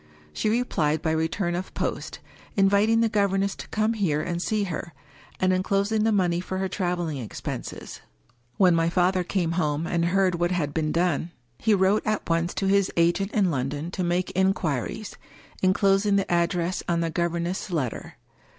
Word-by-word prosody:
She 215 - 0
replied 165 -10 0
by 160 - +1
re 160 0 +1
turn 175 +1 -2
of 180 +2 -5
post, - - -3 0.4
inviting 200 +3 +4
the 230 - +4
governess 200 -2 +1
to - - -8
come 215 +1 0
here 185 -9 0
and 175 +2 -2
see 215 +2 0
her, 170 -2 -5 0.5
and 185 0 +3
inclosing 200 +3 +1
the 225 - +3
money 180 -4 +2
for 185 +1 -4
her 190 0 -1
traveling 175 -6 -2
expenses. 115 - -6 0.6
When 185 -3 +5
my 165 0 +2
father 180 +1 +2
came 175 -2 -1
home, 155 -2 0
and 170 -1 0
heard 185 +1 +2
what 175 0 +2
had 165 -6 -1
been 155 -1 0
done, 170 -1 0 0.3
he 220 - +3
wrote 190 +2 +3
at 215 -1 -1
once 165 +1 0
to 195 - -1
his 195 0 +3
agent 175 +4 +2
in 195 -5 +2
London 145 +4 -3
to 185 - -2
make 175 +1 0
inquiries, 190 - -1 0.4
inclosing 195 +1 +3
the 195 -2 0
address 175 +1 0
on 170 -1 +1
the 165 -1 -1
governess* 170 +3 -2
letter. 145 -10 -3
180 Hz, 175 wpm, -25 LUFS, 170-195 Hz, 0.6 s, When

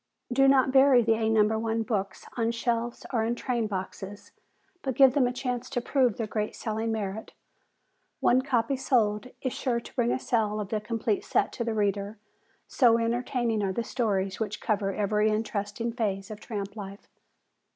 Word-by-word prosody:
Do 270 +2 +5
not 265 -1 +4
bury 265 -2 +6
the 225 0 +3
"A 220 0 0
No. 220 0 +3
1 225 0 -1
Books" 200 -4 -3
on 230 -2 +1
shelves 235 0 -2
or 225 -2 +2
in 230 +2 0
train 240 -2 -1
boxes, 195 0 -6 0.5
but 265 -3 -2
give 265 -1 +7
them 265 -3 +3
a - - -1
chance 250 -1 -3
to 245 - -1
prove 250 -3 +1
their 225 - -1
great 210 0 -3
selling 220 0 -2
merit. 215 0 -4 0.9
One 255 +2 +4
copy 260 -1 0
sold 235 -4 +1 0.2
is 260 - -1
sure 245 -3 -1
to - - -13
bring 240 -2 +2
a - - +1
sale 215 -4 0
of 205 -2 -4
the 215 -1 -1
complete 220 -1 -1
set - - +1
to 235 - -3
the 230 -1 -2
reader, 205 0 -1 0.5
so 235 -4 +4
entertaining 235 -1 0
are 195 -1 0
the 235 - -1
stories 195 -6 -1
which 215 -3 -3
cover 205 -2 0
every 210 +1 +1
interesting 215 +1 -2
phase 200 -4 -2
of 210 - -7
tramp 205 -3 -5
life. 200 -1 -9
225 Hz, 185 wpm, -28 LUFS, 210-245 Hz, 0.9 s, give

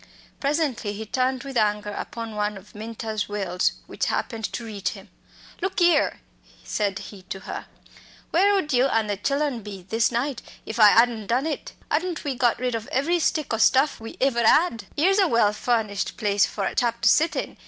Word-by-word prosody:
Presently 280 -7 -1
he 220 +2 -6
turned 255 +3 0
with 275 -1 -7
anger 210 -2 +1
upon 230 +1 -6
one 210 0 -1
of 195 +2 -15
Minta's 220 -1 -4
wails 190 -3 0
which - - -3
happened 225 -3 -2
to 235 - -5
reach 205 -3 -3
him. - - -10 0.5
"Look 380 +1 -1
'ere!" 345 -4 +3 0.4
said 200 -3 -1
he 195 0 -9
to 190 - -5
her, - - -7 0.6
"where 390 +4 +4
ud 305 -7 0
you 250 +1 +4
an' 225 -4 +1
the 205 -1 -1
chillen 275 +2 -1
be 200 -3 -9
this 225 +3 +2
night 240 +1 -1 0.2
if 220 +2 -5
I 210 -1 +9
'adn't 230 -3 +2
done 250 +5 +1
it? 315 - -4 0.2
'Adn't 340 +1 -1
we 285 - -1
got 240 -2 +2
rid 250 -1 -2
of 225 -1 -4
every 330 +7 +1
stick 310 -5 0
o' - - +1
stuff 270 +5 +4
we 225 0 -9
iver 260 -3 +2
'ad? 230 - +3
'Ere's 385 +7 +3
a 385 - +5
well 230 -6 +3
furnished 215 -3 -1
place 205 -3 +2
for 200 - -4
a - - -2
chap 235 -1 0
to - - +3
sit 320 +2 +3
in!" - - -4
235 Hz, 195 wpm, -24 LUFS, 210-280 Hz, 0.6 s, I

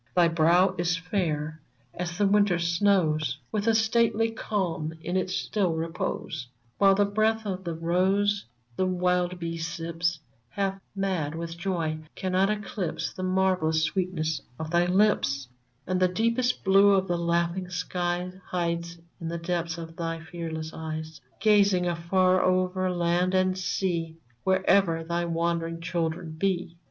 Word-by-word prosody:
Thy 175 -2 +5
brow 170 +3 +4
is 175 +1 +1
fair 160 -5 -2 0.3
as 175 0 -4
the 205 - +3
winter 200 -2 +4
snows, 170 -3 +2
With 210 0 -1
a 225 - +4
stately 225 0 +2
calm 175 -8 -2
in 175 - -2
its 185 0 0
still 190 -6 0
repose; 160 -4 -3 0.3
While 195 -1 +6
the 205 +1 +3
breath 215 +2 +1
of 190 -2 -3
the 170 -2 -3
rose 190 +5 +1 0.3
the 185 - +1
wild 180 0 +1
bee 165 -1 -4
sips, 165 +1 -2 0.3
Half 195 +2 -2
mad 185 -6 -1
with 165 0 -5
joy, 170 -3 -2 0.2
cannot 185 +1 +1
eclipse 205 -4 -3
The - - -7
marvellous 185 -4 +2
sweetness 160 -3 -1 0.2
of 160 0 -5
thy 175 0 +3
lips; 180 -9 +2 0.4
And 185 0 0
the 185 - +4
deepest 230 +6 0
blue 195 +1 +6
of 190 -1 +2
the 175 - 0
laughing 170 +2 0
skies 180 0 -2
Hides 170 -1 -2 0.2
in 165 - -5
the 170 +1 -3
depths 170 -1 -2
of 165 -1 -8
thy 165 -1 -3
fearless 160 -1 -6
eyes, 160 -1 -6 0.2
Gazing 200 -4 +4
afar 185 +2 +2
over 185 0 +1
land 175 +1 +1
and 185 0 +2
sea 175 -3 -2 0.3
Wherever 190 -3 +3
thy 170 +1 -1
wandering 165 0 -1
children 170 -1 -2
be 175 0 -1
180 Hz, 145 wpm, -27 LUFS, 165-190 Hz, 0.4 s, While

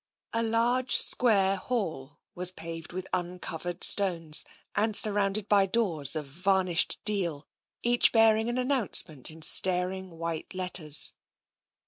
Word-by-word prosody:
The 230 - +1
large 235 +3 0
square 195 -5 +3
hall 160 - -4 0.2
was 180 0 +1
paved 165 -2 -8
with 185 +1 -6
uncovered 175 -1 -4
stones, 170 -6 0 0.3
and 215 +1 0
surrounded 205 -1 0
by 200 -2 +3
doors 175 - +2
of 155 -2 -4
varnished 180 +3 0
deal, 175 -8 -1 0.4
each 240 0 +3
bearing 225 0 +3
an 240 - -2
announcement 250 - +1
in 160 0 -8
staring 185 +2 +3
white 165 +2 -5
letters. 180 -5 +1
185 Hz, 120 wpm, -28 LUFS, 165-215 Hz, 0.4 s, square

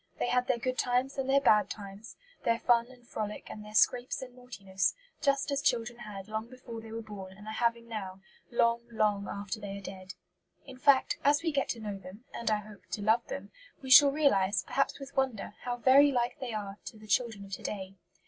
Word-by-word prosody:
They - - -1
had 250 0 +2
their 255 - +2
good 255 +2 -2
times 255 +3 +1
and 265 0 -2
their 275 +1 +5
bad 215 -6 +4
times, 200 +1 -8 0.3
their 230 0 +2
fun 235 0 +3
and 245 -2 -17
frolic 210 -2 -5
and 210 - -8
their 210 0 -10
scrapes 250 +3 +3
and 250 -1 -10
naughtiness, 200 -6 -2 0.3
just 280 -1 +1
as 280 0 0
children 240 -3 0
had 205 -4 -8
long 220 +1 -4
before 245 -3 -9
they 225 0 -11
were 225 0 -5
born 195 -3 -9
and 210 - -12
are 215 - -5
having 235 0 0
now, 195 -4 -6 0.3
long, 235 -1 +2
long 210 -3 +1
after 200 +2 -4
they 200 -1 -6
are - - -8
dead. 185 -1 -8 0.5
In 260 -2 -11
fact, 270 0 +4
as 290 +2 +4
we 330 - +1
get 275 -2 0
to 235 - -2
know 205 -3 -5
them 195 +6 -12
and, 235 - -2
I 215 - +3
hope, 210 -1 -14
to 205 - -2
love 220 +3 +3
them - - -6 0.3
we 260 - -4
shall 280 +3 +10
realize, 215 -10 +2
perhaps 275 - 0
with 275 0 -10
wonder, 260 -7 -1
how 245 -1 -2
very 275 +4 +6
like 245 -2 0
they 255 -3 -4
are 205 -2 -5
to 220 - -8
the 215 - -14
children 215 -1 0
of 195 - -14
to - - -5
day. 195 -2 -5
230 Hz, 225 wpm, -30 LUFS, 205-255 Hz, 0.5 s, shall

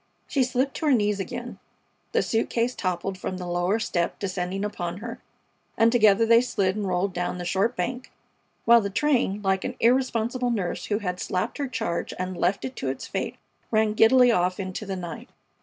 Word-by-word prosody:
She 275 - +1
slipped 260 +2 0
to 315 - -1
her 285 - +5
knees 210 -3 +2
again, 195 - -6 0.5
the - - +2
suit 225 0 0
case, 235 +1 0
toppled 185 -1 -3
from 185 - -4
the 180 - -6
lower 175 +4 +1
step, 175 -6 -1
descending 190 0 -3
upon 175 -4 -4
her, 230 +3 -7 0.6
and 225 0 +5
together 220 -2 +5
they 230 +1 +6
slid 195 -6 0
and 210 -2 -2
rolled 185 +1 0
down 180 0 -2
the 175 - -5
short 195 +7 +1
bank, 250 +8 -3 0.5
while 235 0 +7
the 200 - -2
train, 235 -4 +1
like 190 -1 +1
an - - -4
irresponsible 245 0 +2
nurse 195 -7 -2
who 205 - 0
had 180 -4 -3
slapped 185 +11 -2
her 280 - -1
charge 225 -9 -3
and 185 0 -3
left 175 +3 0
it 260 0 -6
to 135 - -2
its 135 - -4
fate, - - -3 0.3
ran 215 -1 +2
giddily 245 +3 +6
off 180 -2 +1
into 190 +2 -5
the 195 - -2
night. 175 -3 -7
205 Hz, 195 wpm, -25 LUFS, 185-235 Hz, 0.6 s, while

